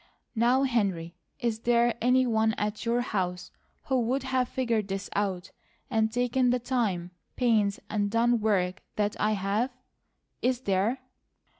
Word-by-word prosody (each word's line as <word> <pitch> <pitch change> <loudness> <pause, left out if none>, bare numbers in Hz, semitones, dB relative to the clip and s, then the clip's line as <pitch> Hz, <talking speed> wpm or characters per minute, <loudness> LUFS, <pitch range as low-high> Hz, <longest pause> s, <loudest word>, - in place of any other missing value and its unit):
Now, 245 +3 +3
Henry, 195 -10 0 0.3
is 235 -3 -1
there 235 0 +2
any 255 +2 +4
one 220 -2 +2
at 210 +2 -3
your 235 +1 +2
house 185 -5 -3 0.3
who 265 -2 +1
would 255 +4 0
have 260 -2 0
figured 230 -5 0
this 195 0 -4
out, 190 -3 -2 0.4
and 220 -1 +2
taken 245 +1 +1
the 250 - +3
time, 220 -9 -1 0.2
pains, 215 -5 +2
and 205 -1 0
done 235 +2 +2
work 190 -4 +1
that 210 0 0
I 215 +1 +2
have? 205 +5 0 0.7
Is 250 0 +1
there?" 205 +4 0
225 Hz, 145 wpm, -28 LUFS, 200-245 Hz, 0.7 s, any